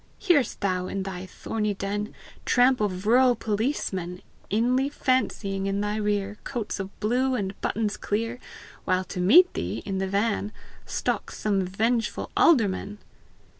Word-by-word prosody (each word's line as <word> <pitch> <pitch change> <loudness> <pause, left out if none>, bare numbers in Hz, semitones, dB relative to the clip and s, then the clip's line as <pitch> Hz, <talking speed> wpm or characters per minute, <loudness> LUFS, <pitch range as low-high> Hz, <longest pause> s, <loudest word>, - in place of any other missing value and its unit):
Hear'st 345 - +2
thou, 185 -2 0
in 195 0 -3
thy 190 -1 -6
thorny 210 +2 -3
den, 205 +2 -3 0.3
Tramp 250 -1 +4
of 190 -2 -1
rural 250 +2 +5
policemen, 205 -5 -2 0.3
Inly 250 +6 +2
fancying, 200 -8 0
in 195 0 -1
thy 210 +1 -1
rear 205 -1 -1
Coats 230 -5 -4
of 195 0 -7
blue 255 +4 +1
and 195 -4 -2
buttons 215 -1 -1
clear, 230 +4 -2 0.4
While 185 0 +1
to 185 0 -7
meet 340 - +7
thee, 95 +6 -3
in 195 -1 -2
the 190 - -1
van 205 +1 0 0.3
Stalks - - -2
some 200 -2 +1
vengeful 220 +5 -1
alderman? 210 - +3
210 Hz, 140 wpm, -26 LUFS, 195-240 Hz, 0.4 s, meet